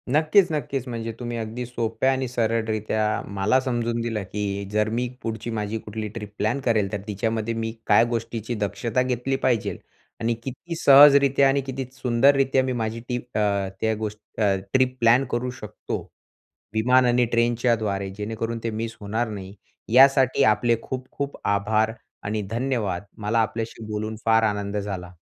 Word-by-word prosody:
नक्कीच-नक्कीच. 155 - +2
म्हणजे 115 -2 -4
तुम्ही 120 -1 -4
अगदी 115 +2 -4
सोप्या 120 +2 0
आणि 130 0 -1
सरळरीत्या 110 -2 0 0.3
मला 105 +7 +3
समजून 120 -3 -1
दिलं, 115 -3 -2
की 100 +1 -3
जर 105 0 +1
मी 120 +3 -1
पुढची 110 0 -4
माझी 105 +1 -2
कुठली 110 0 -5
ट्रिप 105 -2 -6
प्लॅन 110 +7 0
करेल 105 -5 +2
तर 105 -2 -3
तिच्यामध्ये 110 +2 -1
मी 115 0 -2 0.2
काय - - +6
गोष्टीची 115 0 -3
दक्षता 115 +4 -1
घेतली 125 +1 -1
पाहिजेल. 120 -5 +1 0.4
आणि 115 +1 +1
किती 135 +7 -6
सहजरीत्या 140 -2 +7
आणि 140 +1 +2
किती 135 0 -5
सुंदररीत्या 130 +2 +3
माझी 115 0 -2
ती, 125 - 0
अ, 105 -5 -1
त्या 110 0 +2
गोष्टी, 105 +1 -6
अ, 100 -2 +3 0.2
ट्रिप 130 -1 +3
प्लॅन 120 +3 +5
करू 120 +1 -1
शकतो. 105 0 -5 0.7
विमान 125 +4 +4
आणि 120 0 +3
ट्रेनच्या 120 +1 +2
द्वारे 100 -3 -2
जेणेकरून 115 +2 -3
ते 115 - -1
मिस 115 +1 -4
होणार 110 +3 -1
नाही. 100 -2 -7 0.4
यासाठी 135 0 +6
आपले 115 +2 +3
खूप-खूप 130 +2 -5
आभार. 110 +2 +1 0.3
आणि 105 +1 -1
धन्यवाद. 115 -7 -1 0.2
मला 105 +2 0
आपल्याशी 110 0 -2
बोलून 110 +1 -3
फार 115 0 +4
आनंद 105 -1 -1
झाला. 95 -3 -5
115 Hz, 150 wpm, -24 LUFS, 105-125 Hz, 0.7 s, सहजरीत्या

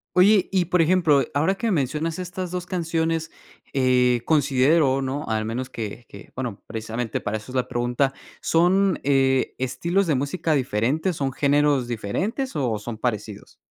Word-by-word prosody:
Oye, 195 +1 +5
y 185 -2 +2
por 180 0 +2
ejemplo, 160 -5 +4
ahora 160 +7 +2
que 230 +4 -2
mencionas 160 - -1
estas 180 0 -5
2 180 0 -4
canciones, 165 -2 -1 0.4
eh, 125 -2 +3
considero, 140 -1 +3
¿no? 135 +3 -3
Al 110 0 0
menos 125 +4 -4
que 115 +1 -6
que, 100 - -13
bueno, 125 -6 -5
precisamente 115 +1 -4
para 110 +1 -2
eso 105 +4 -11
es 130 - -8
la 125 - 0
pregunta. 120 +3 0 0.3
¿Son, 185 +3 +3
eh, 135 -1 +2
estilos 170 +9 0
de 155 - +2
música 155 +5 -1
diferentes, 135 - 0
son 135 -2 -1
géneros 145 -2 +2
diferentes, 185 - -3
o, 120 -7 -1
son 110 +2 -6
parecidos? 110 -3 -4
140 Hz, 155 wpm, -23 LUFS, 125-170 Hz, 0.4 s, Oye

